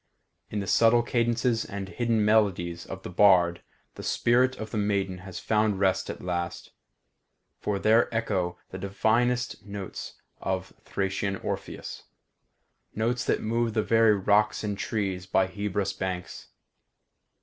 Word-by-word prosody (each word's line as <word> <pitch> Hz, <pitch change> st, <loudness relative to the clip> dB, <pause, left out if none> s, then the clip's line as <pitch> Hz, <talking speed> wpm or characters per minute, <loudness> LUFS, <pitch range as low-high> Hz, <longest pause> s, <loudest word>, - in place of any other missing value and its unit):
In 105 Hz, -, -2 dB
the -, -, -4 dB
subtle 115 Hz, +4 st, +4 dB
cadences 120 Hz, 0 st, +1 dB
and 100 Hz, -3 st, -6 dB
hidden 115 Hz, +1 st, 0 dB
melodies 95 Hz, -6 st, +1 dB
of 95 Hz, 0 st, -7 dB
the -, -, -6 dB
bard 90 Hz, -3 st, +5 dB, 0.3 s
the -, -, -9 dB
spirit 125 Hz, +2 st, +2 dB
of 110 Hz, -1 st, -6 dB
the -, -, -2 dB
maiden 100 Hz, -3 st, 0 dB
has 95 Hz, 0 st, -9 dB
found 105 Hz, -2 st, +1 dB
rest 95 Hz, -1 st, +1 dB
at -, -, -6 dB
last, 85 Hz, -1 st, -3 dB, 0.9 s
for 105 Hz, -1 st, -1 dB
there 110 Hz, +4 st, +3 dB
echo 95 Hz, -6 st, -1 dB
the 95 Hz, -, -6 dB
divinest 115 Hz, +5 st, 0 dB
notes 100 Hz, -1 st, -7 dB, 0.2 s
of 95 Hz, 0 st, -3 dB
Thracian 95 Hz, 0 st, -2 dB
Orpheus; -, -, -6 dB, 0.9 s
notes 120 Hz, +3 st, 0 dB
that -, -, +1 dB
moved 115 Hz, 0 st, 0 dB
the 110 Hz, -, +2 dB
very 115 Hz, -2 st, +4 dB
rocks 105 Hz, +2 st, +2 dB
and 105 Hz, -1 st, -2 dB
trees 95 Hz, -3 st, -2 dB
by 95 Hz, 0 st, +3 dB
Hebrus' 100 Hz, 0 st, -2 dB
banks. 95 Hz, -1 st, -5 dB
100 Hz, 140 wpm, -27 LUFS, 95-115 Hz, 0.9 s, bard